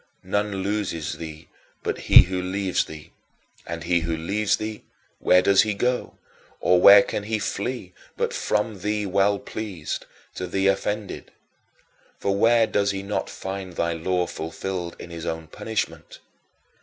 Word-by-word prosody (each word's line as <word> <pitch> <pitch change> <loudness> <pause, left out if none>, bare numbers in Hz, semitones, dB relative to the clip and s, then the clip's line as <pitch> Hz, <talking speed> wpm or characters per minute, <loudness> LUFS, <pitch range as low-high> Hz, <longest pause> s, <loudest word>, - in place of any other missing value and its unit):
None 100 0 -1
loses 100 -6 -2
thee 80 0 -8 0.4
but - - -2
he - - +8
who 90 0 -3
leaves 95 0 0
thee; 75 -1 -11 0.6
and 85 -1 -5
he 85 0 +2
who 80 0 -2
leaves 100 +5 0
thee, 110 0 -5 0.4
where 90 0 +5
does 100 0 +6
he 105 -2 0
go, 125 +4 -1 0.4
or 90 0 +4
where 100 +1 +10
can - - -3
he 110 +2 -2
flee 100 -1 -3 0.2
but - - -1
from 105 -1 -1
thee 105 +2 -1
well 100 +1 +2
pleased 100 -7 -5 0.3
to 90 - -4
thee 95 +2 0
offended? 100 +1 -1 0.9
For 100 - 0
where 115 +2 +5
does 100 -2 +1
he 95 -1 -2
not 100 +1 -2
find 95 -1 -6
thy 85 0 0
law 90 +2 0
fulfilled 85 +2 -5
in 85 - -10
his 85 0 -6
own 80 0 -3
punishment? 110 +7 -4
95 Hz, 155 wpm, -24 LUFS, 85-105 Hz, 0.9 s, where